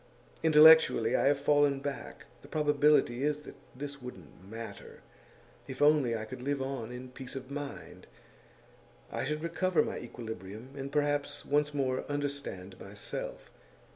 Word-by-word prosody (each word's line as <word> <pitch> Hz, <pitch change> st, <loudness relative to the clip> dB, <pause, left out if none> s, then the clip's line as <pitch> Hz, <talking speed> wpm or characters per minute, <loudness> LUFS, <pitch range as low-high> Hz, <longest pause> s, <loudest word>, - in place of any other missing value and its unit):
Intellectually, 155 Hz, -6 st, +7 dB
I -, -, +2 dB
have 140 Hz, 0 st, +3 dB
fallen 145 Hz, -1 st, +3 dB
back. 140 Hz, 0 st, -6 dB, 0.2 s
The -, -, -14 dB
probability 150 Hz, -4 st, +3 dB
is 150 Hz, 0 st, 0 dB
that -, -, -11 dB, 0.2 s
this 140 Hz, +1 st, -7 dB
wouldn't 95 Hz, -, -11 dB
matter, 115 Hz, +1 st, -9 dB, 0.7 s
if 130 Hz, -, -7 dB
only 145 Hz, -6 st, +4 dB
I 110 Hz, -, -5 dB
could 120 Hz, -, -8 dB
live 140 Hz, +2 st, -1 dB
on 135 Hz, -4 st, -4 dB
in 125 Hz, +1 st, -8 dB
peace 130 Hz, 0 st, -9 dB
of 135 Hz, 0 st, -7 dB
mind; 145 Hz, 0 st, -7 dB, 1.0 s
I -, -, -2 dB
should 150 Hz, +2 st, -2 dB
recover 175 Hz, +2 st, +1 dB
my -, -, -4 dB
equilibrium, 110 Hz, -1 st, -8 dB
and 140 Hz, 0 st, -5 dB
perhaps 145 Hz, 0 st, 0 dB
once 150 Hz, +1 st, +2 dB
more 130 Hz, -3 st, -1 dB
understand 140 Hz, -10 st, -4 dB
myself. 100 Hz, +1 st, -7 dB
140 Hz, 140 wpm, -31 LUFS, 125-145 Hz, 1.0 s, Intellectually